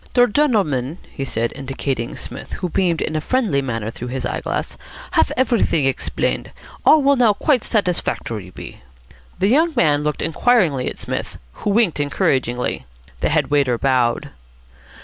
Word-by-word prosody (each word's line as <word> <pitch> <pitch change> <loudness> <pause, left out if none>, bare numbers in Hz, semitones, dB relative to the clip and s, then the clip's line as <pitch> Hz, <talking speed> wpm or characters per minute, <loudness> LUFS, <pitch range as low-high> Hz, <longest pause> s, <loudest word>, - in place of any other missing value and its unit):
"Der 245 -1 +7
gendleman," 195 - +1
he 135 - -5
said, 115 -3 -2
indicating 135 -2 -3
Psmith, 125 - -8
who 180 - -3
beamed 170 -2 +1
in 155 - -3
a 155 - 0
friendly 215 - +1
manner 115 -4 -3
through 120 - -7
his 130 +2 -3
eye - - -2
glass, - - -3 0.4
"haf - - +3
everything 235 - +2
exblained. 135 - -1 0.3
All 310 -2 +6
will 280 +1 +5
now 240 -5 +4
quite 250 +3 +1
satisfactory 165 - -1
be." - - -11 0.6
The 190 +2 +2
young 320 +7 +3
man 150 - +3
looked 150 0 -2
inquiringly 165 - +2
at - - -8
Psmith, - - -5 0.2
who - - -4
winked 205 -6 +2
encouragingly. 130 - 0 0.3
The - - +1
head - - +1
waiter 140 -5 +2
bowed. 125 -2 +1
150 Hz, 155 wpm, -20 LUFS, -, 0.6 s, Der